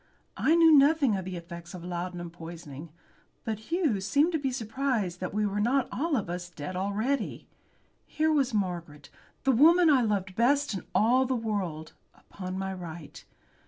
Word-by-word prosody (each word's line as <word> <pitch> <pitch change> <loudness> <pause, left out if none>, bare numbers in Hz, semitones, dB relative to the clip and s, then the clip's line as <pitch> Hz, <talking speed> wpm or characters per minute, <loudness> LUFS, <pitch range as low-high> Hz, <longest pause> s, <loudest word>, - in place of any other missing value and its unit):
I 320 - +3
knew 330 -1 +6
nothing 280 -4 +4
of 190 -2 -4
the 185 -1 -5
effects 170 +1 -9
of 175 - -9
laudanum 175 -1 -5
poisoning, 165 -3 -9 0.5
but 220 -2 -3
Hughes 310 - 0
seemed 300 +5 +3
to 320 - 0
be 275 -2 -1
surprised 230 -6 -2
that 185 - -4
we 210 +1 0
were 205 0 -1
not 250 +5 +2
all 310 +3 -1
of 205 - -3
us 175 0 -5
dead 165 +1 -7
already. 210 +9 -2 0.6
Here 315 +1 +1
was 275 -4 +2
Margaret, 175 -8 -4 0.3
the 270 - +3
woman 325 +6 +6
I 265 -3 +5
loved 200 -4 -1
best 280 +4 +2
in 190 - -6
all 250 +4 +4
the 260 - 0
world, 195 -9 -3 0.2
upon 185 -1 -8
my 190 0 -3
right. 170 -4 -9
205 Hz, 170 wpm, -28 LUFS, 175-270 Hz, 0.6 s, knew